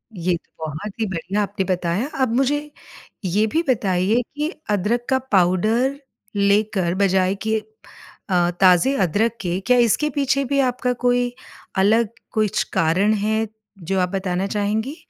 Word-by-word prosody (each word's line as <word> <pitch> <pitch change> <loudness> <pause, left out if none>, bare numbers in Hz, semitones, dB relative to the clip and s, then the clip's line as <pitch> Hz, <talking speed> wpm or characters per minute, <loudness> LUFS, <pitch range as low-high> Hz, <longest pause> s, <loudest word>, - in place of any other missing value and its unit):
ये 175 0 0
तो - - -31
बहुत 190 +9 -7
ही 220 - +1
बढ़िया 190 +2 -2
आपने 200 -1 -3
बताया। 180 +7 -1
अब 255 -3 +2
मुझे 270 +3 +2 0.7
ये 200 +4 +2
भी 320 +10 0
बताइए 205 -1 +2
कि 300 +2 -1 0.2
अदरक 210 +4 0
का 265 -1 +3
पाउडर 215 +9 +2 0.4
लेकर 200 -3 +2
बजाय 190 -1 +2
कि 220 0 +2 0.7
अ, 175 -1 +2
ताज़े 185 +8 +5
अदरक 210 +7 +1
के, 180 -1 -1
क्या 250 +6 +2
इसके 240 +5 +3
पीछे 275 -1 0
भी 280 - +2
आपका 250 0 -1
कोई 245 0 +2 0.4
अलग 215 +3 +3 0.2
कुछ 215 -1 +1
कारण 185 +7 +2
है 220 +1 0 0.4
जो 190 +3 -1
आप 180 - +1
बताना 190 0 -2
चाहेंगी? 215 +7 -1
205 Hz, 145 wpm, -21 LUFS, 185-240 Hz, 0.7 s, ताज़े